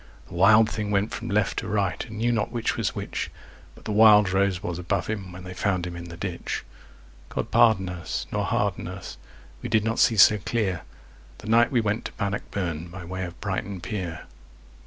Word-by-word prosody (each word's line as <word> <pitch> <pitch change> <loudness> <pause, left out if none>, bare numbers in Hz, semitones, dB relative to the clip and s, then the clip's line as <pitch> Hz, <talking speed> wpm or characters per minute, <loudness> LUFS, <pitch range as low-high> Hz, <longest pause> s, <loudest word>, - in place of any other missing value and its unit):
The - - -11
wild 105 +5 +6
thing 105 -1 -3
went 100 +1 +1
from 115 +2 -5
left 105 0 +1
to - - -6
right 100 -5 0
and 110 -1 -8
knew 120 +2 +1
not 110 -3 0
which 120 -2 -1
was - - -1
which, - - -4 0.5
But - - -17
the 110 - -3
wild 105 -2 +7
rose 95 -1 +1
was 85 0 -3
above 90 -1 -1
him 100 -4 -4
when 90 0 -10
they 90 0 -7
found 90 -1 0
him 90 -1 -6
in 85 0 -7
the 85 - -9
ditch. 90 -1 -4 0.7
God - - -4
pardon 100 -5 +4
us, 90 -1 -4
nor - - -1
harden - - -1
us; - - -8 0.4
we 120 - -5
did 110 -2 +3
not 115 +1 -1
see 115 - +4
so 105 +2 +7
clear 100 -3 -1 0.6
The 110 - -9
night 115 +1 +5
we 120 -3 +3
went 105 +1 -1
to - - -5
Bannockburn 95 -5 -3
by 90 +1 -9
way 95 +1 -4
of 85 0 -10
Brighton 100 -1 -3
Pier. 90 -3 -4
100 Hz, 205 wpm, -25 LUFS, 90-110 Hz, 0.7 s, wild